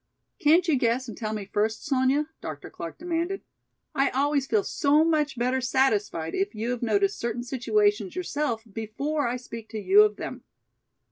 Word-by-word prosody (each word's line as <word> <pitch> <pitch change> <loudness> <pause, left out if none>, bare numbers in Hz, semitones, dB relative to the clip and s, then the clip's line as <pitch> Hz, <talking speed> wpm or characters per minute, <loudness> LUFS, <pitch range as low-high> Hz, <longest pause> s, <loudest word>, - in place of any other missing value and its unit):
"Can't 330 +4 +4
you 305 -4 +3
guess 245 +2 +1
and 225 - -7
tell 215 -2 -4
me 210 -2 -4
first, 215 +3 -1
Sonya?" 275 +1 +2
Dr. 155 -2 -7
Clark 165 -1 -7
demanded. 345 +3 -2 0.5
"I 275 -1 +2
always 280 +1 +1
feel 420 +4 +2
so 295 -2 +3
much 300 -5 +1
better 255 +2 +1
satisfied 215 -10 +1
if 390 - -1
you 225 +3 -2
have 245 - -3
noticed 395 - +1
certain 235 +1 -2
situations 380 - +1
yourself 295 -10 -2
before 275 +7 -2
I 245 +1 -1
speak 230 -3 -9
to 220 - -5
you 390 - +6
of 425 0 +3
them. - - -7
265 Hz, 175 wpm, -26 LUFS, 230-315 Hz, 0.5 s, you